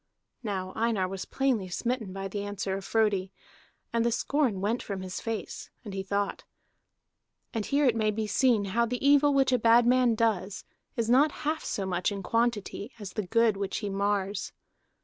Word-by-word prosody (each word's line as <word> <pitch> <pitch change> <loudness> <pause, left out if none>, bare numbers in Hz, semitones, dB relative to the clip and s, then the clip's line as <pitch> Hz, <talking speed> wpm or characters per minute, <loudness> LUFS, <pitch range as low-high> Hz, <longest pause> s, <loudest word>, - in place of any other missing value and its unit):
Now 190 -5 -3
Einar 220 -4 +1
was 190 0 -5
plainly 255 -8 0
smitten 230 +2 -2
by 195 +1 -4
the 200 +1 -4
answer 200 -1 -3
of 195 - -5
Frodi, 200 -4 +1 0.6
and 230 -1 +2
the 235 - +2
scorn 255 -4 +1
went 215 +5 0
from 195 -2 -5
his 185 -1 -5
face, 225 -1 -5 0.2
and 205 - -6
he 195 - -2
thought. 200 +1 -2 1.1
And 220 -3 -2
here 280 -3 +3
may 215 -1 +1
be 215 +1 -1
seen 225 -1 +2
how 235 +1 +3
the 250 +3 -1
evil 285 0 +6
which 270 -2 +3
a 250 - +3
bad 230 +1 +5
man 250 -1 +4
does 205 -4 0 0.3
is 230 -1 -1
not 275 +6 +5
half 310 +1 0
so 195 - -2
much 180 +1 0
in 200 -1 -5
quantity 230 -1 -1
as 205 -4 -8
the 210 -4 -3
good 230 0 +3
which 200 -1 -2
he 205 -2 -3
mars. 200 0 -1
215 Hz, 185 wpm, -28 LUFS, 195-240 Hz, 1.1 s, evil